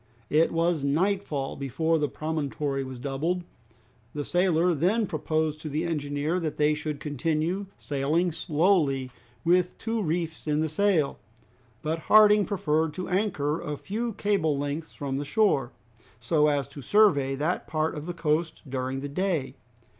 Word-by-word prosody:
It 160 +2 +4
was 165 -2 +1
nightfall 155 -2 0
before 160 +5 0
the 150 -1 0
promontory 145 -2 -2
was 130 -1 -7
doubled. 145 +8 -2 0.7
The 145 -1 -3
sailor 175 -1 +2
then 190 +9 +2
proposed 155 -2 -1
to 155 - -6
the 150 +3 -1
engineer 150 0 -1
that 155 -4 -3
they 150 0 +3
should 150 -1 -4
continue 160 +7 -1
sailing 150 +5 0
slowly 155 -5 +1 0.3
with 180 +1 +3
two 225 0 -2
reefs 165 -2 -2
in 150 0 +1
the 160 - 0
sail. 165 -3 +1 0.6
But 160 +1 -1
Harding 210 -1 +7
preferred 160 -6 0
to 185 - -4
anchor 180 -6 0
a 150 0 -4
few 225 +7 -3
cable 190 -9 +1
lengths 145 +3 -4
from 135 -2 -3
the 145 - -2
shore, 145 - +2 0.5
so 150 +5 +2
as 145 -4 +1
to 145 - -9
survey 145 -8 +4
that 155 +6 -1
part 155 0 0
of 150 +2 -6
the 175 - -4
coast 160 0 -1
during 130 0 -3
the 145 - -4
day. 165 -2 -1
155 Hz, 155 wpm, -27 LUFS, 145-180 Hz, 0.7 s, Harding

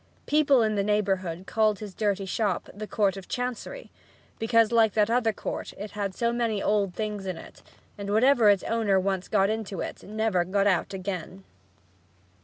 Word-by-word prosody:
People 285 -5 +4
in 215 -1 +1
the 205 - +1
neighborhood 190 -4 -1
called 215 -1 +2
his 205 -2 -8
dirty 200 -1 -1
shop 195 -1 -1
the 215 +1 -7
"Court 200 -2 +1
of 195 - -9
Chancery," 250 - -5 0.5
because, 225 0 +3
like 225 -2 +4
that 215 0 +2
other 235 -2 +2
court, - - -5
it 205 +1 -7
had 200 -2 -3
so 235 0 0
many 230 -3 0
old 200 -3 0
things 210 -3 -4
in 185 -3 -3
it - - -13 0.4
and 200 0 -5
whatever 230 +1 +5
its 200 -2 +3
owner 220 -4 +1
once 190 -1 -1
got 200 -1 +2
into 215 -3 -4
it - - -6
never 215 -4 0
got 195 +3 0
out 190 -4 +1
again. 190 0 -5
210 Hz, 180 wpm, -27 LUFS, 195-225 Hz, 0.5 s, whatever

